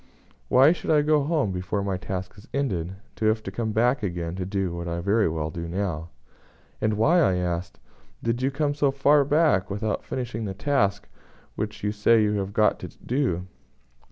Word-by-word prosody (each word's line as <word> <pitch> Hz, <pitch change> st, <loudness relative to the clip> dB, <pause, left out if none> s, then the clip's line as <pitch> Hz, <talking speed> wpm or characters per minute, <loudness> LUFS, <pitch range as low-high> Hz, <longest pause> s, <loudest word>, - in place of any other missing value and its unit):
Why 135 Hz, +4 st, +6 dB
should 175 Hz, -, -4 dB
I 150 Hz, -2 st, +4 dB
go 150 Hz, 0 st, +3 dB
home 150 Hz, -, 0 dB
before 95 Hz, +2 st, -2 dB
my 100 Hz, -1 st, -1 dB
task 95 Hz, -1 st, -5 dB
is 100 Hz, -, -15 dB
ended, 95 Hz, -10 st, -1 dB, 0.2 s
to 110 Hz, -, -1 dB
have 110 Hz, 0 st, +2 dB
to -, -, -5 dB
come 115 Hz, -2 st, -2 dB
back 120 Hz, +5 st, +2 dB
again 85 Hz, -4 st, -3 dB
to 90 Hz, -1 st, -3 dB
do 95 Hz, -3 st, -2 dB
what 85 Hz, 0 st, -5 dB
I 85 Hz, -, -2 dB
can 85 Hz, -, -4 dB
very 105 Hz, 0 st, +2 dB
well 80 Hz, -1 st, -3 dB
do 85 Hz, +1 st, -5 dB
now?" 85 Hz, -3 st, -3 dB, 0.7 s
"And 110 Hz, 0 st, +1 dB
why?" 155 Hz, +12 st, +4 dB
I 95 Hz, -, +3 dB
asked, 90 Hz, 0 st, -3 dB, 0.4 s
"did 115 Hz, +2 st, 0 dB
you 130 Hz, -, +2 dB
come 145 Hz, +1 st, 0 dB
so 145 Hz, -1 st, +2 dB
far 140 Hz, +2 st, +4 dB
back 145 Hz, -, +2 dB
without 105 Hz, +2 st, -2 dB
finishing 120 Hz, -3 st, -4 dB
the 95 Hz, -2 st, -4 dB
task 105 Hz, -5 st, 0 dB, 0.5 s
which -, -, -4 dB
you 105 Hz, -, +1 dB
say 110 Hz, +2 st, +4 dB
you 105 Hz, 0 st, +1 dB
have 95 Hz, 0 st, -3 dB
got 105 Hz, +1 st, +2 dB
to -, -, -6 dB
do?" 120 Hz, -10 st, -2 dB
105 Hz, 200 wpm, -25 LUFS, 90-135 Hz, 0.7 s, Why